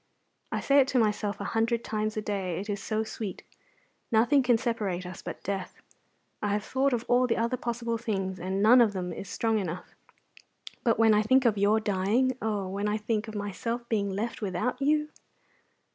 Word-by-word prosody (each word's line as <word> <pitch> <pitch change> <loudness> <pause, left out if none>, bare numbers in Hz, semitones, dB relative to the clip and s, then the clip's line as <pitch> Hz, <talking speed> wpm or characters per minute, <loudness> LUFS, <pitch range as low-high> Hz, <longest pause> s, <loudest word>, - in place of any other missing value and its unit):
I - - -1
say 280 0 +4
it 270 - +5
to 270 - 0
myself 210 -3 +1
a - - -4
hundred 230 +1 +1
times 215 0 -2
a 215 - -2
day, 190 -4 -2
it 205 +2 -4
is 200 -1 -3
so 215 +1 -1
sweet. 215 -3 -6 0.7
Nothing 240 +5 +4
can 245 -2 +3
separate 210 -7 -2
us 180 0 -8
but - - -7
death; 195 -1 -4 0.6
I 205 -1 0
have 205 0 -1
thought 265 +4 +1
of 240 -2 -1
all 250 +1 +4
the 230 - 0
other 235 +2 0
possible 235 -1 -3
things, 195 -5 -2
and 190 +3 -1
none 245 +3 +7
of 220 -3 +3
them 180 -2 -3
is 190 - -7
strong 225 -1 0
enough. 180 -2 -5 0.9
But 230 -3 +2
when 225 -1 +5
I 210 - +4
think 260 +4 +3
of 225 -3 +4
your 205 +2 +3
dying, 215 +6 +1
oh, 210 -3 -1
when 200 +2 -2
I 210 - 0
think 215 0 -2
of 220 - -7
my 205 -1 -3 0.4
being 205 -3 0
left 210 +5 -3
without 245 +6 -2
you!" 300 +2 +2
215 Hz, 200 wpm, -28 LUFS, 200-235 Hz, 0.9 s, none